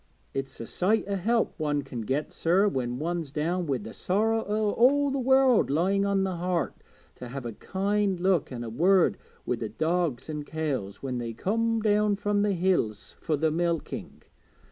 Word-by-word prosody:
It's 135 Hz, 0 st, -4 dB
a 115 Hz, -, -5 dB
sight 200 Hz, -, +1 dB
o' 200 Hz, -, -2 dB
help 225 Hz, +5 st, +1 dB
one 145 Hz, -2 st, 0 dB
can 125 Hz, -3 st, -6 dB
get, 135 Hz, +7 st, -2 dB
sir, 185 Hz, +5 st, +3 dB
when 125 Hz, -9 st, -2 dB
one's 165 Hz, 0 st, -3 dB
down 170 Hz, +4 st, -1 dB
wi' 135 Hz, -2 st, +1 dB
the 110 Hz, -1 st, -9 dB
sorrow 220 Hz, +4 st, +1 dB
o' 210 Hz, 0 st, +1 dB
all 280 Hz, +5 st, +4 dB
the 275 Hz, -, -1 dB
world 265 Hz, -, +4 dB
lying 190 Hz, +7 st, +2 dB
on 195 Hz, -1 st, +2 dB
the 190 Hz, -2 st, -2 dB
heart, 175 Hz, 0 st, -1 dB, 0.4 s
to 125 Hz, -, -9 dB
have 135 Hz, +1 st, -6 dB
a 115 Hz, -, -4 dB
kind 195 Hz, -, -1 dB
look 180 Hz, -5 st, +1 dB
an' 120 Hz, -2 st, -5 dB
a 115 Hz, -, -5 dB
word 180 Hz, -, +3 dB, 0.3 s
wi' 125 Hz, -, -1 dB
the 110 Hz, -1 st, -4 dB
dogs 160 Hz, -5 st, -1 dB
an' 150 Hz, -1 st, -4 dB
cows 145 Hz, -10 st, -4 dB
when 130 Hz, -2 st, -2 dB
they 115 Hz, -1 st, -4 dB
comes 225 Hz, -, 0 dB
down 210 Hz, -1 st, +3 dB, 0.3 s
the 205 Hz, -1 st, +2 dB
hills 170 Hz, -, 0 dB
fur 160 Hz, -, 0 dB
the 160 Hz, +2 st, +1 dB
milking. 170 Hz, 0 st, -3 dB
175 Hz, 185 wpm, -27 LUFS, 135-205 Hz, 0.4 s, all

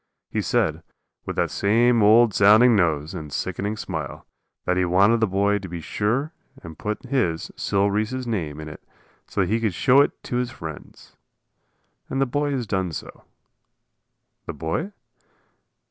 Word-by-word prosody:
He -, -, 0 dB
said, -, -, 0 dB, 0.5 s
with -, -, -3 dB
that -, -, 0 dB
same 115 Hz, +3 st, +3 dB
old 110 Hz, +1 st, +6 dB
sounding 110 Hz, +5 st, +6 dB
nose 80 Hz, -5 st, +1 dB
and 75 Hz, -2 st, -7 dB
sickening 100 Hz, +10 st, -3 dB
smile, 80 Hz, -8 st, -6 dB, 0.4 s
that 90 Hz, -, +1 dB
he 90 Hz, -, +2 dB
wanted 100 Hz, +6 st, +4 dB
the 110 Hz, -, +2 dB
boy 100 Hz, +2 st, +1 dB
to 95 Hz, -2 st, -8 dB
be 85 Hz, 0 st, -5 dB
sure 120 Hz, -, -1 dB, 0.3 s
and 80 Hz, -1 st, -9 dB
put 105 Hz, +5 st, -4 dB
his, 90 Hz, -13 st, -1 dB
Sil 100 Hz, 0 st, 0 dB
Reese's 110 Hz, +5 st, -2 dB
name, 80 Hz, -11 st, -3 dB
in 80 Hz, -, -7 dB
it 75 Hz, -, -10 dB, 0.5 s
so -, -, -1 dB
that 90 Hz, -, 0 dB
he 115 Hz, -, +2 dB
could 110 Hz, -6 st, -1 dB
show 135 Hz, +5 st, +5 dB
it -, -, -1 dB
to 120 Hz, -, -3 dB
his 125 Hz, -1 st, -1 dB
friends. 80 Hz, -3 st, -10 dB, 0.9 s
And 135 Hz, -, -2 dB
the 135 Hz, -, +3 dB
boy 145 Hz, +3 st, -1 dB
has 125 Hz, -3 st, -2 dB
done 95 Hz, -4 st, -1 dB
so. -, -, -9 dB, 1.2 s
The 85 Hz, -, -4 dB
boy? 80 Hz, -, -3 dB
105 Hz, 165 wpm, -23 LUFS, 85-120 Hz, 1.2 s, old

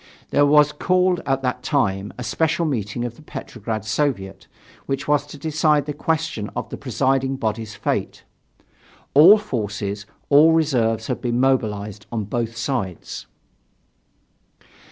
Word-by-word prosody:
There 145 Hz, -, +4 dB
was 150 Hz, 0 st, +5 dB
called 180 Hz, +3 st, +1 dB
at 135 Hz, 0 st, 0 dB
that 125 Hz, 0 st, -1 dB
time 105 Hz, -9 st, 0 dB
a 125 Hz, -, -5 dB
special 165 Hz, +7 st, 0 dB
meeting 120 Hz, -4 st, -2 dB
of 120 Hz, -1 st, -6 dB
the -, -, -14 dB
Petrograd 110 Hz, -7 st, -6 dB
Soviet, 110 Hz, -5 st, -2 dB, 0.4 s
which 135 Hz, 0 st, -2 dB
was 145 Hz, -1 st, +2 dB
to 145 Hz, -, -10 dB
decide 150 Hz, -1 st, +1 dB
the 150 Hz, -, -3 dB
question 155 Hz, -8 st, -2 dB
of -, -, -4 dB
the -, -, -5 dB
presiding 135 Hz, 0 st, 0 dB
body's 110 Hz, -3 st, -3 dB
fate. -, -, -2 dB, 0.9 s
All 170 Hz, +9 st, +9 dB
forces, 105 Hz, -, -4 dB, 0.2 s
all 150 Hz, +3 st, +7 dB
reserves 120 Hz, -9 st, +1 dB
had -, -, -3 dB
been 120 Hz, 0 st, 0 dB
mobilized 105 Hz, -6 st, 0 dB
on 115 Hz, -2 st, -2 dB
both 115 Hz, +2 st, -3 dB
sides. 120 Hz, -, -4 dB
130 Hz, 135 wpm, -22 LUFS, 110-150 Hz, 0.9 s, All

